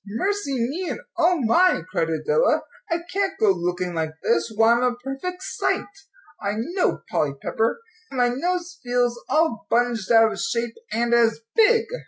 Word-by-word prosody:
"Mercy 285 - -1
me, 285 +10 -2
and - - -4 0.2
O 345 +1 +3
my!" 295 - +3
cried 165 - 0
Adela. 160 - +1 0.3
"I 335 0 -1
can't 390 0 0
go 210 -2 +5
looking 180 0 -2
like 160 -1 -3
this; 230 0 +1
why, 225 +2 +4
I'm 240 - +1
a 250 -1 +1
perfect 270 +9 -6
sight, - - -1 0.6
I 200 0 -1
know, 345 - -1
Polly 145 -2 +1
Pepper! 225 - -1 0.3
and 265 - -7
my 245 -1 +3
nose 350 +6 -2
feels 245 -1 0
all 315 -8 +1
bunged 240 -3 +1
out 225 -1 +6
of - - -6
shape 235 -8 -1 0.2
and 235 +1 0
as 230 -1 +3
big!" 455 +1 +5
245 Hz, 170 wpm, -23 LUFS, 225-345 Hz, 0.6 s, out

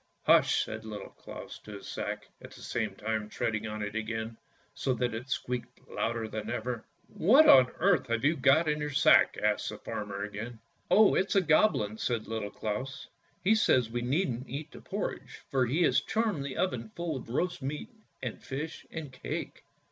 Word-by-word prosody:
"Hush! - - +5
" - - -6
said 110 0 -6
Little 105 -2 -7
Claus - - -10
to 105 - -11
his 100 - -9
sack, - - -4
at - - -10
the - - -14
same - - -2
time 110 0 -2
treading 110 0 -2
on 105 0 -4
it 105 0 -4
again, 110 0 -3 0.4
so 130 - 0
that 120 -1 -1
it 120 +4 -6
squeaked 125 -1 -3
louder 115 -1 -2
than 110 -1 -5
ever. 120 0 -3 0.2
"What 265 - +5
on 130 -2 +8
earth 175 -7 +3
have 115 +2 0
you 155 +3 +4
go 140 +2 +5
in 150 -2 0
your 150 - -1
sack? 140 - +5
" - - -8
asked - - +1
the - - -6
farmer 100 -1 -5
again. 110 +3 -6 0.2
" - - -41
Oh, 215 -1 +6
it's 190 - +1
a 195 - +6
Goblin," 155 - +3
said 115 -3 -1
Little 110 -2 -3
Claus; 130 +6 -4 0.2
" - - -38
he 205 - +5
says 130 - +3
we 120 +1 -1
needn't 130 -1 -1
eat 145 +4 -5
the - - -11
porridge, - - -5
for 130 -2 +2
he 155 +9 +2
has - - +4
charmed 215 -10 0
the 140 -2 -5
oven 125 -11 -1
full 170 -3 -2
of 130 - -7
roast 175 +7 -1
meat 140 +3 -4 0.3
and 125 - -4
fish 150 +4 -6
and 160 -4 -6
cake." - - -5
125 Hz, 200 wpm, -30 LUFS, 110-150 Hz, 0.4 s, on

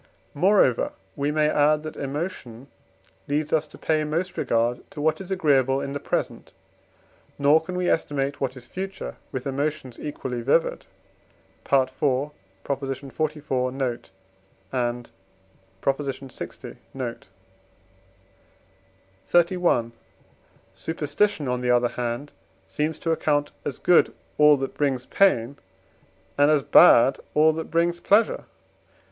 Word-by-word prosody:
Moreover 175 - +3 0.2
we 140 +1 -1
may 150 0 +2
add 150 0 +3
that 155 - -7
emotion 140 -4 -5 0.6
leads 150 +1 -1
us 155 -1 +2
to - - -15
pay 155 -1 0
most 170 +5 -2
regard 120 +1 0
to - - -10
what 155 +5 +1
is 190 - -9
agreeable 135 -8 +2
in 140 0 -4
the 145 - -3
present, - - -3 0.8
nor 145 +3 +4
can 180 +2 -6
we 180 0 -1
estimate 140 -3 -1
what 130 -1 -2
is 120 - -11
future 190 +6 -6
with 130 -1 -5
emotions 140 -2 -3
equally 130 -4 -5
vivid. 140 +7 +1 0.8
(IV. 130 -2 +3
xliv. 135 +2 -3
note, 130 -3 -3 0.6
and 120 -1 -2 0.7
lx. 135 -2 -4 0.3
note.) 125 -3 -5 2.0
XXXI. 170 -9 +2 0.8
Superstition, 160 +1 -1
on 125 0 -1
the 125 - -1
other 120 0 +3
hand, 120 +4 -4 0.4
seems 155 +1 -2
to 165 - -2
account 145 -2 0
as 140 - -4
good 180 - +3 0.2
all 150 -1 +7
that 135 0 -4
brings 135 -4 -1
pain, 140 -9 +2 0.8
and 145 +1 +6
as 150 -3 +3
bad 130 +1 +6 0.2
all 155 +1 +5
that 160 +1 -5
brings 170 +1 +1
pleasure. 210 +5 +2
145 Hz, 120 wpm, -24 LUFS, 130-155 Hz, 2.0 s, all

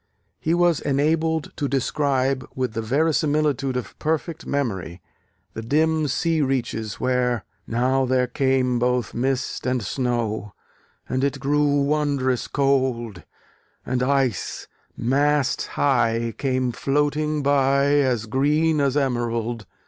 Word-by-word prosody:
he 165 +2 +1
was 175 -3 +3
enabled 160 +3 0
to 145 - -1
describe, 135 0 0
with 130 -3 -2
the 115 - -2
verisimilitude 145 0 +1
of 125 - -7
perfect 160 +1 -2
memory, 95 - -2 0.5
the 110 - -5
dim 155 +5 +1
sea 160 +3 0
reaches 120 -5 -2
where,... 125 -3 0 0.2
Now 130 +3 +1
there 130 0 +2
came 130 -1 +1
both 125 -1 0
mist 130 +1 -2
and 125 -2 0
snow, 110 -3 -2 0.5
And 130 +1 -1
it 140 0 0
grew 145 0 +2
wondrous 140 -4 0
cold: 130 -7 0 0.6
And 125 0 -1
ice, 130 -5 0 0.3
mast 140 +2 +1
high, 115 -4 +1
came 130 -2 0
floating 150 +3 0
by, 140 0 +3
As 125 -5 +1
green 150 +6 +2
as 140 0 +1
emerald. 120 -5 -1
135 Hz, 120 wpm, -23 LUFS, 125-145 Hz, 0.6 s, was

